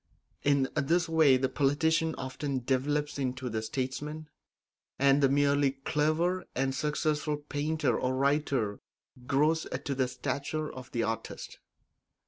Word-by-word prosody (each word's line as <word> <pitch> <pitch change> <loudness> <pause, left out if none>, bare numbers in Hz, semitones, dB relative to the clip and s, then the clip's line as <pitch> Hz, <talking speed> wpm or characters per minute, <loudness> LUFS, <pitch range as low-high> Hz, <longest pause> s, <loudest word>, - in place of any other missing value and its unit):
In 140 -2 +3
this 165 +4 +2
way 160 -5 +5
the 130 +1 +1
politician 160 +4 +1
often 130 0 -3
develops 145 +3 0
into 130 -1 -2
the 110 0 -1
statesman, 145 +6 -4 0.7
and 140 +1 +4
the 135 - +5
merely 140 0 +3
clever 155 +6 0
and 135 0 0
successful 150 0 0
painter 150 +2 -1
or 130 0 0
writer 135 -6 +1 0.5
grows 155 +4 +2 0.2
to 140 - -1
the 130 -1 +1
stature 140 +4 -3
of 130 -1 -10
the 115 - 0
artist. 115 0 -5
140 Hz, 125 wpm, -30 LUFS, 130-150 Hz, 0.7 s, way